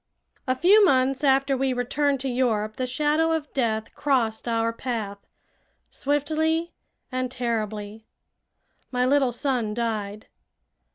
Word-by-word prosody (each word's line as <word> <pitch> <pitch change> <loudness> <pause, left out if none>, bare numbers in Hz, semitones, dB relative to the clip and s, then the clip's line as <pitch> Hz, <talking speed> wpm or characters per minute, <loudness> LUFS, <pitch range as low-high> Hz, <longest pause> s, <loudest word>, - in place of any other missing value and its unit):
A 255 - +2
few 395 +9 +6
months 265 -5 +3
after 275 0 +3
we 265 0 0
returned 275 +3 0
to 270 - -3
Europe 225 -4 0
the 255 - -1
shadow 300 +5 +1
of 305 -3 -3
death 220 -4 -1
crossed 240 -6 0
our 230 0 0
path, 225 -5 -4 0.7
swiftly 315 +4 0 0.4
and 255 0 -2
terribly. 220 -3 -4 0.8
My 250 -1 +1
little 270 -1 +3
son 240 -4 -1
died. 215 -3 -3
255 Hz, 120 wpm, -25 LUFS, 225-285 Hz, 0.8 s, few